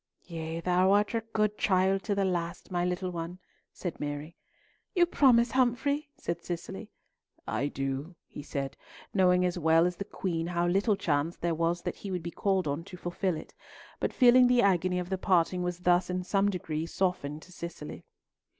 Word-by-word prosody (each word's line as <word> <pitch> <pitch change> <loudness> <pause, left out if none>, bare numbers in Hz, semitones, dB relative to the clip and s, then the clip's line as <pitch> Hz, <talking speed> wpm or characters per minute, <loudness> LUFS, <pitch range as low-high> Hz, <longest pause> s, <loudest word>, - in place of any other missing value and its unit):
"Yea, 165 -1 -5
thou 180 +2 +3
art 205 +2 +2
a 230 - +1
good 215 -1 0
child 190 0 +3
to 205 - -1
the 200 -1 +1
last, 175 0 -3
my 175 -1 0
little 180 +1 -1
one," 170 +1 -5 0.3
said 175 -3 -6
Mary. 145 +2 -5 0.6
"You 350 -1 +6
promise, 245 -8 +4
Humfrey?" 265 +4 +1
said 170 - -4
Cicely. 175 -1 -6 0.6
"I 110 +7 0
do," 135 +5 -4
he - - -9
said, 140 -2 -4 0.4
knowing 180 -2 +4
as 180 0 -1
well 160 +1 +4
as 180 -1 -1
the - - -3
Queen 170 -4 -3
how 175 0 0
little 195 +4 +2
chance 165 -4 0
there 170 -1 -1
was 170 +1 0
that - - -3
he 200 - -7
would 180 -3 -3
be 170 - -4
called 190 -3 0
on 145 +3 -2
to 180 - -10
fulfil 175 0 -2
it, - - -10 0.5
but - - 0
feeling 250 0 +6
that 250 - +3
the 240 - +4
agony 185 -2 +2
of 180 +1 -4
the 190 - -1
parting 180 -1 +2
was 180 0 -3
thus 175 0 +3
in 180 0 -2
some 195 +2 +2
degree 165 -4 -3
softened 160 -5 -2
to 185 - -16
Cicely. 170 -4 -8
180 Hz, 190 wpm, -29 LUFS, 165-195 Hz, 0.6 s, You